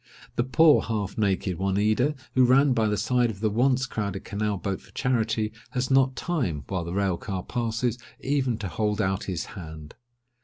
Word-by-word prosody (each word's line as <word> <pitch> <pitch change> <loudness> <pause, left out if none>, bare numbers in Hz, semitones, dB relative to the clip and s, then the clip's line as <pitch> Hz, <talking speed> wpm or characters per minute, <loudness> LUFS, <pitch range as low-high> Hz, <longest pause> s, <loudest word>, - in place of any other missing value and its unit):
The 120 - +2
poor 150 +4 +5
half 105 -3 -3
naked 95 -4 0
Oneida, 105 +9 +1 0.2
who 130 - +5
ran 130 +2 +5
by 110 -3 +2
the 105 0 0
side 120 +3 +2
of 100 -3 -6
the 110 0 0
once 130 +4 +2
crowded 100 -5 -4
canal 105 0 -1
boat 95 +1 -3
for - - -19
charity, 110 -4 0 0.2
has 125 +1 -1
not 130 -1 +4
time, 125 - -2
while 95 -3 -1
the 85 - -5
rail 95 -1 0
car 95 -2 -4
passes, 120 0 -1 0.2
even 130 -4 0
to 110 -3 -4
hold 105 +4 -1
out 95 -2 0
his 90 -4 -3
hand! 80 -5 -9
110 Hz, 185 wpm, -26 LUFS, 95-125 Hz, 0.2 s, poor